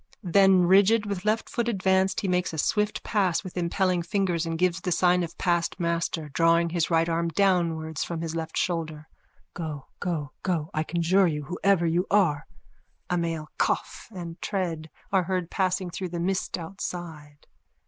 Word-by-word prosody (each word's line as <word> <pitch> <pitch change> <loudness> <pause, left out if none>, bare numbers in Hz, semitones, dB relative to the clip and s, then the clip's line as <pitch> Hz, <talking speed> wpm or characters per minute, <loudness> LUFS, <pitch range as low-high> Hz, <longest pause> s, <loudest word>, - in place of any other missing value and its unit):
Then 190 0 +5
rigid 200 +4 +5
with 200 -1 -4
left 215 +1 +1
foot 235 -1 -2
advanced 190 -2 +1
he 200 - -2
makes 180 -2 0
a - - -4
swift 210 +6 0
pass 195 -4 +1
with 185 - -9
impelling 180 +1 +1
fingers 175 -2 -1
and 165 0 -2
gives 175 0 +1
the 180 - -2
sign 180 +1 +3
of 170 - -5
past 175 +1 0
master, 170 -2 -1
drawing 165 +3 +3
his 170 -2 0
right 165 -1 +3
arm 170 0 0
downwards 165 -4 +1
from 165 -1 -4
his 165 -1 -4
left 160 -1 -4
shoulder.)_ 160 -3 -2 0.5
Go, 155 -5 -5
go, 155 -5 -3
go, 165 -4 -1
I 155 - 0
conjure 175 +4 +2
you, 150 -3 -2
whoever 180 +3 +1
you 170 +3 +1
are! 175 -8 +2 0.6
_(A 180 - +2
male 165 -2 -3
cough - - -1
and 170 -4 -8
tread 170 -6 -3 0.2
are 190 -3 +2
heard 180 -1 -2
passing 185 -2 0
through 185 +1 -4
the 170 0 -4
mist 185 +2 -1
outside. 165 -4 -7
175 Hz, 170 wpm, -26 LUFS, 165-190 Hz, 0.6 s, Then